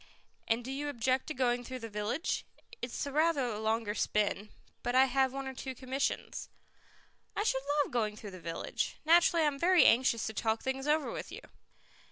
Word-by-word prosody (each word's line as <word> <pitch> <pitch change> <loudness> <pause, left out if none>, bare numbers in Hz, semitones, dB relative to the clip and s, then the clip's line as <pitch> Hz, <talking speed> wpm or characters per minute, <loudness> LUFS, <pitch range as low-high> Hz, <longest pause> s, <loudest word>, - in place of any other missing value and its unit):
"And 230 +1 0
do 260 - -4
you 290 +2 -3
object 260 0 0
to 310 - -4
going 245 -1 +1
through 255 +1 -6
the 230 -2 -6
village? 210 - -2 0.4
It 240 - -3
is - - -3
rather 295 0 +2
a 220 -3 -3
longer 220 -1 0
spin, 210 -1 0 0.3
but 245 +1 -1
I 260 +1 +7
have 265 0 +2
one 275 0 -5
or 265 - -5
two 260 0 -6
commissions." 260 +2 -3 0.9
"I 410 - 0
should 265 -11 +1 0.2
love - - -9
going 215 -3 0
through 210 -1 -9
the 185 - -9
village. 165 0 -3
Naturally 335 +1 +5
I - - +3
am 285 -2 0
very 360 +2 +5
anxious 235 -1 +4
to 220 - -3
talk 220 +1 -1
things 265 +1 -2
over 300 0 +2
with - - -6
you." - - -8
255 Hz, 200 wpm, -32 LUFS, 225-280 Hz, 0.9 s, I